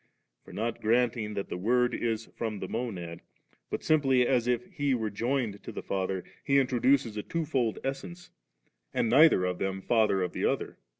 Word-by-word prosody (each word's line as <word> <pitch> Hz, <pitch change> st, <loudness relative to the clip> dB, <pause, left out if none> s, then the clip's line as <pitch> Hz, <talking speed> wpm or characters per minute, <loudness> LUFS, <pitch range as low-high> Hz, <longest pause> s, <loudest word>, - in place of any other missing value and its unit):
For -, -, -14 dB
not 115 Hz, +2 st, -3 dB
granting 115 Hz, -1 st, +1 dB
that 100 Hz, -, -4 dB
the 90 Hz, -, -4 dB
Word 125 Hz, +4 st, +2 dB
is 115 Hz, -1 st, -1 dB
from 110 Hz, -2 st, -3 dB
the 95 Hz, -, -5 dB
Monad, 90 Hz, -9 st, -4 dB, 0.5 s
but -, -, -4 dB
simply 135 Hz, -5 st, +3 dB
as 120 Hz, -2 st, +1 dB
if 125 Hz, +8 st, +1 dB
He 145 Hz, -5 st, +1 dB
were 110 Hz, -3 st, -2 dB
joined 115 Hz, -1 st, -1 dB
to -, -, -8 dB
the -, -, -6 dB
Father, 95 Hz, -1 st, -2 dB, 0.2 s
he 140 Hz, -, +3 dB
introduces 130 Hz, -3 st, +2 dB
a -, -, -1 dB
twofold 135 Hz, -6 st, -1 dB
essence, 175 Hz, +7 st, -5 dB, 0.6 s
and 115 Hz, -, +1 dB
neither 140 Hz, -, +6 dB
of 90 Hz, -1 st, -2 dB
them 95 Hz, 0 st, -2 dB
Father 105 Hz, -3 st, +2 dB
of 90 Hz, -, -3 dB
the -, -, -3 dB
other. -, -, -1 dB
115 Hz, 180 wpm, -29 LUFS, 100-130 Hz, 0.6 s, neither